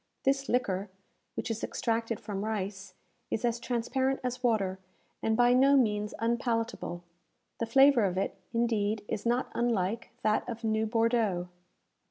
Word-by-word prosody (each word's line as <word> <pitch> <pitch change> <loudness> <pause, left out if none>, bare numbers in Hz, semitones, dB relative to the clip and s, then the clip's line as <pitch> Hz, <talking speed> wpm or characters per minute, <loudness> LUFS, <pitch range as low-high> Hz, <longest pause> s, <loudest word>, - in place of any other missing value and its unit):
This 275 0 +1
liquor, 200 -5 0 0.5
which - - -3
is 225 - -4
extracted 230 -2 -1
from 200 -1 -4
rice, 200 -3 -4 0.3
is 225 - -1
as 235 0 0
transparent 260 +3 0
as 250 0 -3
water, 200 -6 +1 0.4
and 220 0 +1
by 245 0 +5
no 275 +2 +6
means 210 -4 +1
unpalatable. 230 -6 -1 0.6
The 230 - -1
flavour 270 -1 +6
of 185 -1 -1
it, 195 - 0 0.2
indeed, 220 -3 0
is 215 +2 -3
not 240 +2 +1
unlike 230 -2 0
that 215 +3 +1
of 230 0 -6
new 220 0 +1
Bordeaux. 225 -6 +1
230 Hz, 145 wpm, -30 LUFS, 210-240 Hz, 0.6 s, no